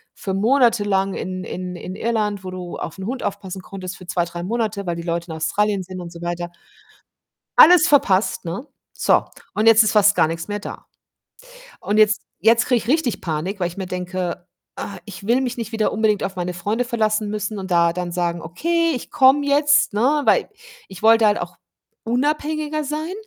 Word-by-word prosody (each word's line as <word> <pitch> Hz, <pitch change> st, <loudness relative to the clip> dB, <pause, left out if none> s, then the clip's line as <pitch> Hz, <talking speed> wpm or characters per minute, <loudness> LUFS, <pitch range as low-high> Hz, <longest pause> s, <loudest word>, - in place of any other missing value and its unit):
für 190 Hz, -, -4 dB
monatelang 205 Hz, -3 st, +2 dB
in 185 Hz, 0 st, -4 dB
in 180 Hz, 0 st, -6 dB
in 185 Hz, +1 st, -7 dB
Irland, 210 Hz, -3 st, -1 dB
wo 185 Hz, -, -6 dB
du 180 Hz, -1 st, -7 dB
auf 165 Hz, -, -6 dB
'n 190 Hz, -, -6 dB
Hund 250 Hz, +3 st, -4 dB
aufpassen 195 Hz, -2 st, -5 dB
konntest 185 Hz, -1 st, -8 dB
für 185 Hz, -, -13 dB
2, 175 Hz, -1 st, 0 dB
3 175 Hz, 0 st, -7 dB
Monate, 215 Hz, -1 st, -2 dB
weil 170 Hz, -, -1 dB
die 170 Hz, -, -5 dB
Leute 170 Hz, 0 st, -3 dB
in -, -, -5 dB
Australien 200 Hz, +4 st, 0 dB
sind 185 Hz, 0 st, -8 dB
und 170 Hz, -1 st, -8 dB
so 170 Hz, 0 st, -11 dB
weiter. 175 Hz, 0 st, -3 dB, 1.1 s
Alles 345 Hz, -1 st, +8 dB
verpasst, 200 Hz, -10 st, +2 dB
ne? 190 Hz, -, -5 dB, 0.3 s
So, -, -, +2 dB, 0.3 s
und 215 Hz, +2 st, 0 dB
jetzt 225 Hz, 0 st, +7 dB
ist 215 Hz, -, +1 dB
fast 205 Hz, -1 st, +5 dB
gar -, -, +4 dB
nix 165 Hz, +1 st, -5 dB
mehr 205 Hz, 0 st, -3 dB
da -, -, -8 dB, 1.0 s
und 210 Hz, +2 st, -1 dB
jetzt 215 Hz, -1 st, +4 dB, 0.2 s
jetzt 230 Hz, +2 st, +4 dB
kriege 250 Hz, -, +3 dB
ich 215 Hz, -, -8 dB
richtig 275 Hz, -4 st, +1 dB
Panik, 170 Hz, +4 st, -3 dB
weil 175 Hz, -, +1 dB
ich 175 Hz, -, -11 dB
mir 190 Hz, -1 st, -4 dB
denke: 180 Hz, -1 st, -4 dB, 0.3 s
„Ah, 200 Hz, -, -6 dB
ich 195 Hz, -2 st, -10 dB
will 240 Hz, +4 st, +3 dB
mich 250 Hz, -2 st, -2 dB
nicht 230 Hz, -1 st, -5 dB
wieder 220 Hz, -1 st, 0 dB
unbedingt 215 Hz, -1 st, +1 dB
auf 195 Hz, 0 st, -4 dB
meine 180 Hz, 0 st, -3 dB
Freunde 210 Hz, +7 st, -1 dB
verlassen 215 Hz, -2 st, 0 dB
müssen,“ 210 Hz, 0 st, -3 dB
und 190 Hz, -1 st, -6 dB
da 170 Hz, -1 st, +3 dB
dann 175 Hz, 0 st, -4 dB
sagen: 170 Hz, -1 st, -1 dB
„Okay, 335 Hz, -, 0 dB
ich 250 Hz, -, -6 dB
komme 285 Hz, +1 st, +4 dB
jetzt,“ 290 Hz, 0 st, +3 dB
ne, 265 Hz, +8 st, +2 dB
weil -, -, +3 dB, 0.4 s
ich 190 Hz, +1 st, -11 dB
wollte 225 Hz, 0 st, +6 dB
halt 205 Hz, 0 st, +2 dB
auch -, -, -6 dB, 0.5 s
unabhängiger 300 Hz, +4 st, -1 dB
sein. 310 Hz, +5 st, -3 dB
205 Hz, 200 wpm, -21 LUFS, 180-235 Hz, 1.1 s, Alles